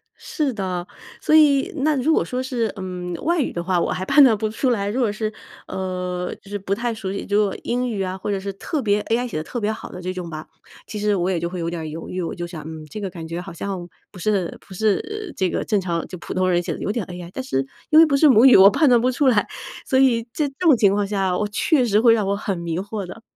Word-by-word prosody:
是 290 Hz, -4 st, -2 dB
的。 185 Hz, -4 st, -3 dB, 0.4 s
所 -, -, +1 dB
以 300 Hz, +3 st, +5 dB
那 300 Hz, +2 st, +2 dB
如 285 Hz, +5 st, +2 dB
果 -, -, +3 dB
说 250 Hz, 0 st, -3 dB
是， 240 Hz, -5 st, -1 dB
嗯， 180 Hz, -2 st, -5 dB
外 340 Hz, +1 st, +1 dB
语 280 Hz, -, 0 dB
的 170 Hz, -, -4 dB
话， 180 Hz, 0 st, +1 dB
我 -, -, 0 dB
还 185 Hz, -, -3 dB
判 285 Hz, +7 st, +6 dB
断 230 Hz, -6 st, +5 dB
不 215 Hz, 0 st, -1 dB
出 255 Hz, +4 st, 0 dB
来。 200 Hz, -5 st, 0 dB
如 245 Hz, +6 st, -2 dB
果 225 Hz, -4 st, +2 dB
是 215 Hz, +1 st, -3 dB, 0.4 s
呃， 180 Hz, -1 st, -3 dB
就 200 Hz, -, -16 dB
是 205 Hz, -, -4 dB
不 195 Hz, 0 st, -2 dB
太 235 Hz, +2 st, -2 dB
熟 205 Hz, -4 st, -5 dB
悉， 200 Hz, -, -4 dB
如 205 Hz, +1 st, +3 dB
果 200 Hz, -, -2 dB
英 250 Hz, +1 st, -1 dB
语 210 Hz, -4 st, -2 dB
啊， 185 Hz, 0 st, -4 dB
或 190 Hz, -, -5 dB
者 200 Hz, -, -1 dB
是 200 Hz, +1 st, -4 dB
特 285 Hz, -, -3 dB
别 210 Hz, -3 st, +2 dB
AI 240 Hz, +2 st, 0 dB
写 230 Hz, -, -5 dB
得 155 Hz, -, -2 dB
特 240 Hz, -, -5 dB
别 215 Hz, -1 st, 0 dB
好 220 Hz, -, -7 dB
的 180 Hz, -, -9 dB
这 185 Hz, +1 st, -3 dB
种 180 Hz, -2 st, -6 dB
吧， 155 Hz, -1 st, -7 dB, 0.4 s
其 210 Hz, -, -5 dB
实 210 Hz, 0 st, +1 dB
我 180 Hz, -1 st, 0 dB
也 175 Hz, -, 0 dB
就 170 Hz, +1 st, -2 dB
会 185 Hz, -, -5 dB
有 165 Hz, 0 st, -2 dB
点 170 Hz, -1 st, -4 dB
儿 -, -, -5 dB
犹 160 Hz, +2 st, -7 dB
豫。 185 Hz, -, -3 dB
我 170 Hz, -, -3 dB
就 175 Hz, -, -4 dB
想， 170 Hz, -3 st, -8 dB
嗯， 160 Hz, 0 st, -8 dB
这 215 Hz, -, -7 dB
个 195 Hz, -, -3 dB
感 170 Hz, -3 st, -8 dB
觉 165 Hz, +1 st, -4 dB
好 190 Hz, +2 st, -9 dB
像 180 Hz, 0 st, -5 dB, 0.2 s
不 190 Hz, -, -12 dB
是 195 Hz, -2 st, 0 dB
不 195 Hz, -, -11 dB
是 340 Hz, -, -1 dB
这 185 Hz, -2 st, 0 dB
个 -, -, -2 dB
正 210 Hz, -3 st, +1 dB
常 170 Hz, -2 st, -2 dB
就 185 Hz, -, -8 dB
普 -, -, -6 dB
通 185 Hz, 0 st, +1 dB
人 175 Hz, -1 st, +2 dB
写 -, -, -3 dB
的， -, -, -8 dB
有 -, -, -2 dB
点 215 Hz, -3 st, -2 dB
AI， 175 Hz, -1 st, -8 dB
但 265 Hz, -, -4 dB
是 135 Hz, -, -1 dB, 0.2 s
因 310 Hz, -, +5 dB
为 330 Hz, -, +9 dB
不 290 Hz, -3 st, +1 dB
是 300 Hz, +3 st, +5 dB
母 245 Hz, -1 st, +6 dB
语， 260 Hz, -, +8 dB
我 195 Hz, +1 st, +9 dB
判 300 Hz, +8 st, +3 dB
断 240 Hz, -2 st, +6 dB
不 255 Hz, +2 st, +2 dB
出 270 Hz, +2 st, +1 dB
来。 225 Hz, -5 st, +3 dB, 0.4 s
所 260 Hz, -, +1 dB
以 250 Hz, -4 st, +4 dB
在 300 Hz, -, 0 dB
这 275 Hz, -, -10 dB
种 335 Hz, -6 st, +5 dB
情 200 Hz, -3 st, +4 dB
况 205 Hz, 0 st, 0 dB
下， 195 Hz, -3 st, 0 dB
我 210 Hz, -, 0 dB
确 250 Hz, +7 st, +2 dB
实 210 Hz, -2 st, +3 dB
会 230 Hz, 0 st, +6 dB
让 215 Hz, -3 st, +1 dB
我 200 Hz, -, +1 dB
很 200 Hz, -2 st, -3 dB
迷 170 Hz, -1 st, -3 dB
惑 200 Hz, +1 st, -4 dB
的。 185 Hz, +5 st, -10 dB
200 Hz, 315 characters per minute, -22 LUFS, 180-245 Hz, 0.4 s, 为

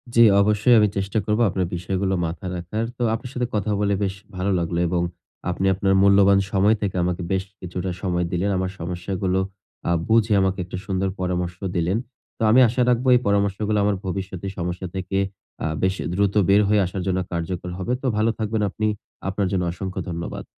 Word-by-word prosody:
জ্বি, 115 Hz, -, +8 dB, 0.2 s
অবশ্যই 105 Hz, +4 st, +4 dB
আমি 105 Hz, -, +5 dB
চেষ্টা 95 Hz, +2 st, -1 dB
করবো 105 Hz, +2 st, +1 dB
আপনার 95 Hz, -1 st, -1 dB
বিষয়গুলো 95 Hz, +2 st, -1 dB
মাথায় 90 Hz, +3 st, -4 dB
রাখার। 90 Hz, +6 st, -3 dB
তো 125 Hz, -, -1 dB
আপনার 120 Hz, +2 st, -4 dB
সাথে 125 Hz, -1 st, -1 dB
কথা 105 Hz, 0 st, 0 dB
বলে 100 Hz, -1 st, +2 dB
বেশ 95 Hz, -1 st, -1 dB, 0.2 s
ভালো 95 Hz, +2 st, 0 dB
লাগলো 85 Hz, 0 st, -1 dB
এবং 85 Hz, 0 st, 0 dB, 0.5 s
আপনি 90 Hz, +2 st, -1 dB
আপনার 95 Hz, +1 st, +1 dB
মূল্যবান 100 Hz, 0 st, +6 dB
সময় 105 Hz, +2 st, +4 dB
থেকে 100 Hz, -2 st, -2 dB
আমাকে 90 Hz, +1 st, -1 dB
বেশ 95 Hz, 0 st, +1 dB, 0.2 s
কিছুটা 90 Hz, +1 st, -4 dB
সময় 90 Hz, -2 st, 0 dB
দিলেন। 90 Hz, +3 st, 0 dB
আমার 95 Hz, 0 st, -1 dB
সমস্যাগুলো 90 Hz, +2 st, -2 dB, 0.5 s
আ -, -, +3 dB, 0.2 s
বুঝে 110 Hz, -1 st, +3 dB
আমাকে 95 Hz, 0 st, 0 dB
একটা 90 Hz, -, -6 dB
সুন্দর 95 Hz, -1 st, 0 dB
পরামর্শ 90 Hz, -1 st, -2 dB, 0.2 s
দিলেন। 90 Hz, +4 st, +1 dB, 0.4 s
তো -, -, -13 dB
আমি 125 Hz, +4 st, +6 dB
আশা 120 Hz, +3 st, 0 dB
রাখবো 125 Hz, +1 st, +1 dB
এই 125 Hz, -, +5 dB
পরামর্শগুলো 100 Hz, +1 st, +1 dB
আমার 105 Hz, -1 st, +2 dB
ভবিষ্যতের 95 Hz, 0 st, -4 dB
সমস্যা 90 Hz, +1 st, -3 dB
থেকে 95 Hz, +1 st, -2 dB, 0.5 s
আ -, -, 0 dB, 0.2 s
বেশ 95 Hz, +1 st, +2 dB
এ -, -, -5 dB
দ্রুত 100 Hz, +1 st, +1 dB, 0.2 s
বের 100 Hz, +2 st, +6 dB
হয়ে 105 Hz, -1 st, +4 dB
আসার 95 Hz, +1 st, -4 dB
জন্য 95 Hz, 0 st, +1 dB
কার্যকর 85 Hz, +1 st, -3 dB
হবে। 95 Hz, +6 st, -2 dB
তো 135 Hz, -, -1 dB
ভালো 110 Hz, +1 st, +3 dB
থাকবেন 110 Hz, 0 st, -1 dB
আপনি। 110 Hz, +2 st, -1 dB, 0.4 s
আপনার 100 Hz, 0 st, 0 dB
জন্য 95 Hz, -2 st, +1 dB
অসংখ্য 95 Hz, +1 st, -5 dB
ধন্যবাদ। 85 Hz, 0 st, -5 dB
95 Hz, 190 wpm, -23 LUFS, 90-105 Hz, 0.5 s, জ্বি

